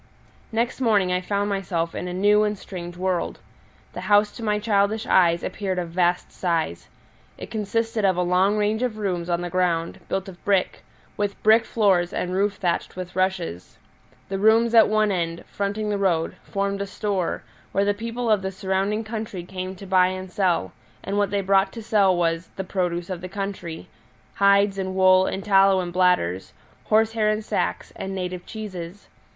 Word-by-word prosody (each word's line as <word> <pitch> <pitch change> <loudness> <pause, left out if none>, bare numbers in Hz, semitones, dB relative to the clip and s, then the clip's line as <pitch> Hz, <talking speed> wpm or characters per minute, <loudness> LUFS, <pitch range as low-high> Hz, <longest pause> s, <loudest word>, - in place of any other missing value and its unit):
Next 235 +3 -1
morning 205 -6 +3
I 180 - 0
found 200 +2 -1
myself 175 -4 -2
in 180 - -4
a - - -4
new 205 +3 +3
and 210 -1 -1
strange 175 -2 -8
world. 185 -1 -1 0.6
The 180 - -6
house 205 +2 +3
to 235 - -11
my 210 -1 +1
childish 210 0 +1
eyes 170 -2 +3
appeared 190 -2 -3
of 175 -2 -2
vast 175 0 +1
size: 165 - -2 0.5
it - - -9
consisted 225 +1 -1
of 190 -2 +3
a 180 - +2
long 185 +4 +2
range 210 +2 0
of 245 -4 -1
rooms 180 -4 -2
on 170 0 0
the 175 - -4
ground, 170 -2 0
built 190 0 -2
of 185 -2 -12
brick, 195 -2 0 0.3
with 205 -1 -3
brick 220 +1 +5
floors 190 -7 +2
and 180 - -2
roof 200 +2 +1
thatched 175 -3 -2
with 180 0 -7
rushes. 185 - -2 0.5
The 195 0 -3
rooms 225 +3 +4
at 225 -3 +7
one 215 -1 +2
end, 170 -2 -2
fronting 205 +1 -3
the 205 - -1
road, 170 -5 +1
formed 200 0 -2
a 200 - -3
store, 195 -3 -2 0.3
where 200 +1 +1
the 205 - +2
people 230 +3 -4
of 215 -3 +3
the 190 - -2
surrounding 195 +3 -1
country 215 -4 -5
came 185 +1 -6
to 195 - -11
buy 185 -1 +4
and 185 0 -5
sell, 180 - 0 0.3
and 200 - -3
what 205 -2 +2
they 200 0 0
brought 195 +1 +3
to 230 - -7
sell 200 -4 +3
was 165 0 0
"the 190 - -3
produce 180 -1 -2
of 180 -2 -4
the 185 - -6
country" 195 -4 -5 0.5
hides 200 0 +3
and 190 0 -3
wool 185 0 +5
and 190 - -3
tallow 195 -2 +5
in 175 -1 -3
bladders, 175 - +1 0.3
horsehair 220 0 +2
in 215 +1 0
sacks, - - -2
and 195 0 -5
native 180 -1 -5
cheeses. 195 -3 -7
195 Hz, 185 wpm, -24 LUFS, 180-210 Hz, 0.6 s, at